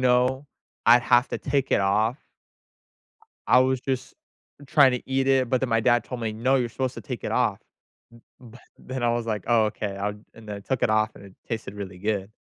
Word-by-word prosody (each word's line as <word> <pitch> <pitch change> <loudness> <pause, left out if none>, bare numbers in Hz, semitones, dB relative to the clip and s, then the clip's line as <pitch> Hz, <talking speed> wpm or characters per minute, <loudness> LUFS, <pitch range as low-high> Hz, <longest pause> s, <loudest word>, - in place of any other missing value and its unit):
know 130 +2 +2 0.4
I'd 120 +1 +7
have 120 +2 +3
to - - -4
take 135 -1 -1
it - - +3
off. 105 +6 +1 1.3
I 125 - +6
was 130 0 +1
just 130 -2 -3 0.5
trying 140 -3 +5
to 125 - -2
eat 135 0 +1
it, 130 -3 +3
but 130 - +2
then 130 - -1
my 115 -1 +3
dad 120 0 +3
told 125 -2 -7
me, 110 -1 -2
"No, 130 +5 +1
you're 125 -2 0
supposed 130 +2 -3
to - - -7
take - - -7
it - - -3
off." - - +1 0.8
b 120 -3 -14 0.3
but - - -20
then 130 -1 -4
I 120 - +3
was 120 -1 -2
like, 105 -4 -3
"Oh, 115 -2 +4
okay. 105 -1 -4
I'll" 105 +1 -2 0.2
and 110 -1 -15
then 105 - -4
I - - -8
took 130 +3 -2
it - - +3
off 110 0 +1
and 100 - -13
it 95 - -16
tasted 110 -3 -5
really 100 -2 -7
good. 105 0 -2
120 Hz, 225 wpm, -25 LUFS, 110-130 Hz, 1.3 s, I'd